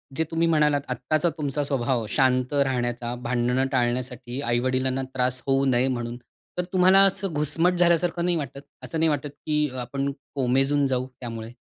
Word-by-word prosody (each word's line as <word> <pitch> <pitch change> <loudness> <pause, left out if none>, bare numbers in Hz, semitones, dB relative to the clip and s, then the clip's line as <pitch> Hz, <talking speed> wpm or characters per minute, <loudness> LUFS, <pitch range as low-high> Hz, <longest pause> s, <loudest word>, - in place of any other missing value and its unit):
जे 160 - +1
तुम्ही 165 +1 +1
म्हणालात 150 -3 +3
आत्ताचा 140 +7 0
तुमचा 145 -1 -1
स्वभाव 125 -4 0
शांत 130 0 +2
राहण्याचा, 120 -3 0
भांडणं 125 +2 0
टाळण्यासाठी 125 0 -2
आई-वडिलांना 130 +2 0
त्रास 125 0 0
होऊ 135 0 +2
नये 130 0 +2
म्हणून, 120 -1 -3 0.4
तर 180 - 0
तुम्हाला 185 +1 +6
असं 195 -2 0
घुसमट 150 +4 +2
झाल्यासारखं 175 0 +2
नाही 175 -1 +2
वाटत? 140 -1 -5 0.2
असं 165 - -4
नाही 160 - +3
वाटत 145 -1 -1 0.2
की 150 -1 +1 0.2
आपण 140 +3 -2 0.2
कोमेजून 135 +2 +2
जाऊ 130 -1 -1
त्यामुळे? 115 -2 -6
135 Hz, 155 wpm, -25 LUFS, 125-150 Hz, 0.4 s, तुम्हाला